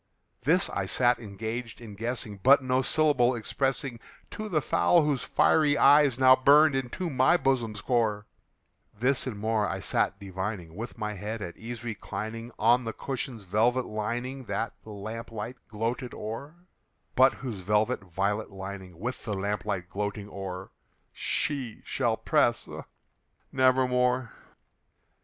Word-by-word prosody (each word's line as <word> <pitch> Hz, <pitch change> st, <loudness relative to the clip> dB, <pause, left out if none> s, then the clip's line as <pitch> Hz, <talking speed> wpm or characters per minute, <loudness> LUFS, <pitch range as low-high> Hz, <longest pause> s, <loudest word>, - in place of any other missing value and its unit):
This -, -, +3 dB
I -, -, -2 dB
sat 120 Hz, -1 st, +3 dB
engaged 110 Hz, +2 st, -5 dB
in 115 Hz, -3 st, -10 dB
guessing, 115 Hz, -1 st, -3 dB
but 135 Hz, +3 st, +6 dB
no 130 Hz, 0 st, +2 dB
syllable 130 Hz, -4 st, +3 dB
expressing 130 Hz, +1 st, -2 dB, 0.3 s
To 215 Hz, 0 st, -5 dB
the 165 Hz, -5 st, +2 dB
fowl 170 Hz, +2 st, +3 dB
whose 145 Hz, -3 st, 0 dB
fiery 150 Hz, -2 st, +3 dB
eyes 140 Hz, -2 st, +6 dB
now 130 Hz, 0 st, +7 dB
burned 145 Hz, +3 st, +6 dB
into 135 Hz, +7 st, -2 dB
my 130 Hz, +3 st, +4 dB
bosom's 115 Hz, -, 0 dB
core; 110 Hz, -4 st, 0 dB, 0.7 s
This 130 Hz, +2 st, +2 dB
and 115 Hz, -5 st, -4 dB
more 110 Hz, 0 st, 0 dB
I 95 Hz, -, -3 dB
sat 95 Hz, +1 st, 0 dB
divining, 95 Hz, -3 st, -5 dB
with 115 Hz, +4 st, -7 dB
my 105 Hz, -1 st, -3 dB
head 105 Hz, +2 st, -5 dB
at 85 Hz, -, -7 dB
ease 120 Hz, +1 st, -7 dB
reclining 110 Hz, +1 st, -5 dB
On 120 Hz, +3 st, +4 dB
the 115 Hz, -1 st, -4 dB
cushion's 125 Hz, -4 st, -4 dB
velvet 115 Hz, +7 st, +2 dB
lining 120 Hz, +5 st, -4 dB
that 115 Hz, -, -2 dB
the -, -, -14 dB
lamp 110 Hz, +3 st, -7 dB
light 115 Hz, +3 st, -6 dB
gloated 115 Hz, +3 st, -3 dB
o'er, 125 Hz, +9 st, -6 dB, 0.6 s
But 130 Hz, +1 st, +6 dB
whose 120 Hz, -7 st, -6 dB
velvet 105 Hz, +3 st, +1 dB
violet 100 Hz, +4 st, -1 dB
lining 95 Hz, -2 st, -8 dB
with 120 Hz, +8 st, -5 dB
the 105 Hz, -4 st, -3 dB
lamp 100 Hz, +1 st, -2 dB
light 95 Hz, -4 st, -2 dB
gloating 105 Hz, +1 st, -4 dB
o'er, 95 Hz, -1 st, -6 dB, 0.4 s
She 135 Hz, -7 st, -2 dB
shall -, -, 0 dB
press, -, -, +2 dB
ah, -, -, -8 dB, 0.7 s
nevermore! 125 Hz, -1 st, +2 dB
115 Hz, 145 wpm, -28 LUFS, 105-130 Hz, 0.7 s, now